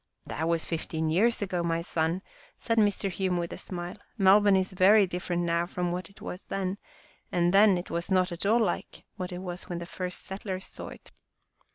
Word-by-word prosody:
" -, -, -48 dB
That 160 Hz, +2 st, -3 dB
was 165 Hz, -1 st, +1 dB
fifteen 160 Hz, -1 st, -2 dB
years 215 Hz, +6 st, +3 dB
ago, 185 Hz, -3 st, -1 dB
my 170 Hz, 0 st, 0 dB
son," 170 Hz, +2 st, -1 dB, 0.3 s
said 230 Hz, -1 st, +1 dB
Mr. 205 Hz, -2 st, +2 dB
Hume 185 Hz, -1 st, 0 dB
with 170 Hz, -1 st, -3 dB
a -, -, -7 dB
smile. 175 Hz, -1 st, -5 dB
" -, -, -40 dB
Melbourne 200 Hz, 0 st, +6 dB
is 190 Hz, 0 st, +1 dB
very 195 Hz, +3 st, +6 dB
different 175 Hz, -1 st, -2 dB
now 170 Hz, 0 st, +1 dB
from 180 Hz, -1 st, -2 dB
what 180 Hz, -1 st, -4 dB
it 200 Hz, -, -19 dB
was 180 Hz, -, -6 dB
then, 195 Hz, 0 st, -2 dB, 0.5 s
and 175 Hz, 0 st, +2 dB
then 200 Hz, -1 st, +6 dB
it 175 Hz, -, -6 dB
was 170 Hz, 0 st, -2 dB
not 185 Hz, -2 st, +3 dB
at 170 Hz, -, -5 dB
all 220 Hz, +4 st, +4 dB
like 200 Hz, -6 st, -2 dB, 0.3 s
it 180 Hz, -, -5 dB
was 180 Hz, -1 st, -6 dB
when 175 Hz, -1 st, -3 dB
its 170 Hz, 0 st, -8 dB
first 180 Hz, -1 st, -4 dB
settlers 190 Hz, -1 st, -5 dB
saw -, -, -8 dB
it. -, -, -11 dB
180 Hz, 210 wpm, -28 LUFS, 175-195 Hz, 0.5 s, Melbourne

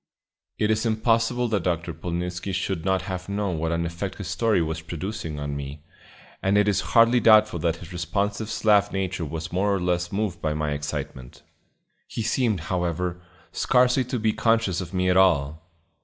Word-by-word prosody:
It 105 Hz, 0 st, +1 dB
is 110 Hz, +1 st, +1 dB
impossible 115 Hz, +2 st, +1 dB
that 105 Hz, -3 st, +1 dB
Dr. 85 Hz, -1 st, -2 dB
Polnitzski 90 Hz, +2 st, -4 dB
should 90 Hz, -2 st, -2 dB
not 95 Hz, -1 st, +1 dB
have 90 Hz, 0 st, -5 dB
known 100 Hz, -4 st, -1 dB
what 80 Hz, +1 st, -1 dB
an 85 Hz, 0 st, 0 dB
effect 85 Hz, +3 st, -4 dB
his 100 Hz, -, -6 dB
story 115 Hz, -5 st, +2 dB
was 80 Hz, -1 st, -2 dB
producing 85 Hz, -1 st, -5 dB
on 70 Hz, 0 st, -3 dB
me, 70 Hz, +1 st, -7 dB, 0.6 s
and 100 Hz, +1 st, +2 dB
it 105 Hz, 0 st, +3 dB
is 100 Hz, -, +2 dB, 0.2 s
hardly 115 Hz, +2 st, +6 dB
doubtful 110 Hz, -4 st, +5 dB
that 85 Hz, 0 st, 0 dB
his 85 Hz, +1 st, -11 dB
responsive 100 Hz, +5 st, -2 dB
Slav 105 Hz, -2 st, +3 dB
nature 95 Hz, -3 st, -2 dB
was 80 Hz, +2 st, -6 dB
more 100 Hz, +3 st, +1 dB
or 100 Hz, -, +1 dB
less 90 Hz, 0 st, -1 dB
moved 95 Hz, -4 st, -2 dB
by 75 Hz, -1 st, -1 dB
my 75 Hz, -1 st, -1 dB
excitement. 70 Hz, -3 st, -5 dB, 0.6 s
He 115 Hz, -, -4 dB
seemed, 115 Hz, -4 st, +1 dB
however, 90 Hz, +1 st, -2 dB, 0.3 s
scarcely 125 Hz, +1 st, +3 dB
to 125 Hz, +1 st, -3 dB
be 110 Hz, -1 st, +1 dB
conscious 115 Hz, -6 st, +1 dB
of 90 Hz, -, -7 dB
me 90 Hz, -1 st, 0 dB
at 90 Hz, 0 st, +3 dB
all. 80 Hz, -3 st, +2 dB
90 Hz, 180 wpm, -25 LUFS, 85-105 Hz, 0.6 s, hardly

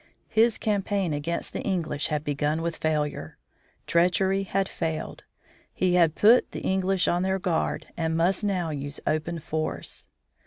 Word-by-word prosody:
His 225 Hz, 0 st, +3 dB
campaign 200 Hz, -4 st, 0 dB
against 150 Hz, +4 st, -3 dB
the -, -, -3 dB
English 165 Hz, -6 st, -1 dB
had 150 Hz, -1 st, -1 dB
begun 150 Hz, +2 st, -1 dB
with 170 Hz, -1 st, -2 dB
failure. 150 Hz, -, -2 dB, 0.5 s
Treachery 190 Hz, +3 st, +2 dB
had 195 Hz, 0 st, 0 dB
failed. 160 Hz, -4 st, -4 dB, 0.5 s
He 185 Hz, -1 st, +1 dB
had 170 Hz, -3 st, +4 dB
put 230 Hz, +4 st, +5 dB
the -, -, -5 dB
English 190 Hz, -1 st, +1 dB
on 175 Hz, -, +2 dB
their 190 Hz, +1 st, +1 dB
guard 180 Hz, -4 st, -2 dB
and 160 Hz, -1 st, -1 dB
must 180 Hz, +4 st, +2 dB
now 185 Hz, -5 st, 0 dB
use 145 Hz, 0 st, -5 dB
open 155 Hz, +2 st, -1 dB
force. 155 Hz, 0 st, -4 dB
170 Hz, 150 wpm, -26 LUFS, 155-190 Hz, 0.5 s, put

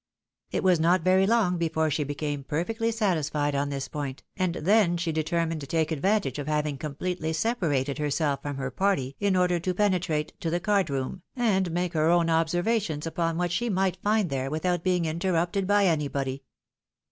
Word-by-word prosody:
It -, -, -2 dB
was 180 Hz, -3 st, +4 dB
not 170 Hz, +2 st, +3 dB
very 190 Hz, +1 st, +4 dB
long 210 Hz, -6 st, +2 dB
before 160 Hz, -1 st, 0 dB
she 150 Hz, +1 st, 0 dB
became 145 Hz, 0 st, -3 dB
perfectly 225 Hz, -, -1 dB
satisfied 155 Hz, -9 st, 0 dB
on 140 Hz, 0 st, 0 dB
this 140 Hz, -1 st, -3 dB
point, 140 Hz, -3 st, -5 dB
an.L 180 Hz, -2 st, -1 dB
then 185 Hz, 0 st, +3 dB
she 170 Hz, -1 st, -1 dB
determined 160 Hz, 0 st, -1 dB
to 140 Hz, -, -7 dB
take 160 Hz, +2 st, 0 dB
advantage 160 Hz, -, 0 dB
of 145 Hz, -, -5 dB
having 150 Hz, -1 st, 0 dB
completely 160 Hz, +3 st, -3 dB
separated 160 Hz, -, 0 dB
herself 145 Hz, -1 st, 0 dB
from 145 Hz, -1 st, -4 dB
her 135 Hz, -1 st, -3 dB
party 140 Hz, -9 st, 0 dB
in 200 Hz, -2 st, +2 dB
order 180 Hz, -1 st, +2 dB
to 180 Hz, +2 st, -2 dB
penetrate 180 Hz, -6 st, 0 dB
to 165 Hz, -, -2 dB
the 175 Hz, +2 st, 0 dB
card 200 Hz, -2 st, +1 dB
room, 140 Hz, +6 st, -3 dB
and 200 Hz, -7 st, +1 dB
make 175 Hz, +1 st, -1 dB
her 155 Hz, 0 st, +2 dB
own 170 Hz, -1 st, +3 dB
observations 165 Hz, 0 st, 0 dB
upon 165 Hz, 0 st, -1 dB
what 175 Hz, -1 st, 0 dB
shj 240 Hz, +5 st, 0 dB
might 185 Hz, -1 st, 0 dB
find 210 Hz, -5 st, +1 dB
there, 135 Hz, 0 st, -1 dB
without 170 Hz, +3 st, -1 dB
being 180 Hz, -2 st, +1 dB
interrupted 175 Hz, +3 st, 0 dB
by 205 Hz, 0 st, +4 dB
anybody. 140 Hz, -5 st, -1 dB
165 Hz, 180 wpm, -27 LUFS, 150-185 Hz, -, was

